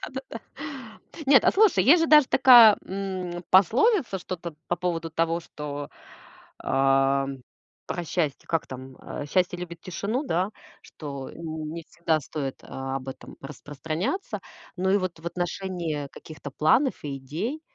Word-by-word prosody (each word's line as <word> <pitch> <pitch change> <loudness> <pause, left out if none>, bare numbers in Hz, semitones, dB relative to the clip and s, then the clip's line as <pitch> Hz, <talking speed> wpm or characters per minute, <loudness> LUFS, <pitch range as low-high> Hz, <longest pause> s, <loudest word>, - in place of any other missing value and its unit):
Да-да-да. 265 -4 -7 0.9
Нет, 270 -1 +6
а - - +5
слушай, 390 - +4
есть 330 +6 +6
же 330 - +1
даже 300 -3 +7
такая, 240 -5 +8
м, 185 -2 -4
пословица 230 - +4
что-то 175 -2 -6
по 175 - 0
поводу 165 -1 -2
того, 165 +1 0
что, 145 -2 -7 0.7
ам, 135 0 +1 0.4
про 175 - -3
счастье. 155 -4 -2
Как 165 -1 0
там? 130 0 -9
Э, 145 - -7
счастье 180 +1 +1
любит 170 -1 -7
тишину, 200 +8 -3
да? 185 - 0 0.3
Что 140 -3 -8
не 160 0 -6
всегда 165 -2 0
стоит 135 -1 -5
об 135 0 -5
этом 135 - -9
распространяться. 155 - -4 0.4
Но 190 +1 0
и 200 - +5
вот 185 -3 -4
в 170 - -11
отношении 175 -3 -3
каких-то 155 -2 -10
планов 190 - +2
и 140 -1 -3
идей. 180 - -4
170 Hz, 140 wpm, -26 LUFS, 145-195 Hz, 0.9 s, такая